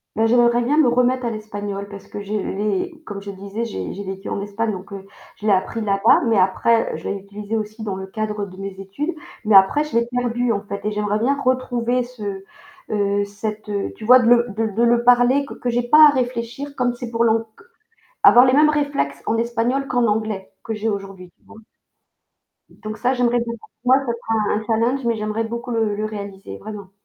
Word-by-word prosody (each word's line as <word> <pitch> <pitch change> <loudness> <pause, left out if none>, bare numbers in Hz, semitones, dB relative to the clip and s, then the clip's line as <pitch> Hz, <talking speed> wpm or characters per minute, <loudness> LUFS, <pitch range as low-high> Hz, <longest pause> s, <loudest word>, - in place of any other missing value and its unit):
Bah, 220 - +2
j'aimerais 240 +1 +4
bien 285 +5 +1
me 310 -4 +5
remettre 250 +1 +2
à - - 0
l'espagnol 205 -2 -5
parce 200 -1 -11
que 205 - -7
je 200 +1 -6
l'ai 215 - -2
comme 200 -2 -6
je 200 - -8
disais, 200 +3 -5
j'ai 95 - -5
j'ai 200 - -6
vécu 195 0 -7
en - - -3
Espagne, 205 +2 -2
donc, 190 0 -8
heu, 195 -1 -8 0.3
je 210 - -10
l'ai 215 - +3
appris 195 +4 -1
là-bas, 200 +1 +4
mais 225 -2 +3
après, 225 +5 +2
heu, - - -4
je 160 - -6
l'ai - - -1
utilisé 205 +2 -6
aussi 215 0 -4
dans 200 -3 -3
le 190 0 -6
cadre 210 0 -3
de 185 -1 -13
mes 195 0 -5
études, 240 - -4 0.3
mais 215 -1 +4
après, 195 +10 +6
je 300 -5 -7
l'ai 235 0 +2
perdu, 245 -1 -1
en 200 -2 -1
fait, 200 -1 -7
et 210 - -1
j'aimerais 210 0 -1
bien 275 +5 +1
retrouver 250 -2 0
ce, 205 -6 -7 0.5
heu, 205 -1 +1
cette, 210 +1 -6
heu, 200 -1 -2
tu 215 - -9
vois? 250 +3 +8
De 245 - 0
le 240 0 +5
de 225 - +1
l 220 -2 -2
de 230 - +2
le 235 0 +3
parler, 245 +3 +4
q - - -10
que 245 - -2
j'ai 240 +1 0
pas 300 +5 +8
à - - +6
réfléchir, 255 +1 -3
comme 245 -2 0
c'est 240 -1 -7
pour 230 0 +1
l'ang 225 -1 +3
q - - -19 0.6
avoir 245 +1 +8
les 255 - +4
mêmes 300 +3 +5
réflexes 285 - -1
en 225 - 0
espagnol 235 +4 0
qu'en 245 -2 +1
anglais 210 -2 -2
que 225 - -4
j'ai 215 +1 -1
aujourd'hui. 195 -3 -6
Tu - - -34
vois? - - -15 1.3
Donc 215 0 -5
ça, 250 +1 +1
j'aimerais 245 -1 +2
beaucoup, 235 -1 -5 0.2
moi, 255 +1 +5
ça 240 - 0
sera 225 -2 -1
un 215 +1 -2
challenge, 235 +5 +1
mais 230 -1 +1
j'aimerais 215 +1 -2
beaucoup 235 +2 -5
le 225 -3 0
le 215 +1 -2
réaliser, 200 - -7
vraiment. 200 - -9
225 Hz, 225 wpm, -21 LUFS, 205-245 Hz, 1.3 s, vois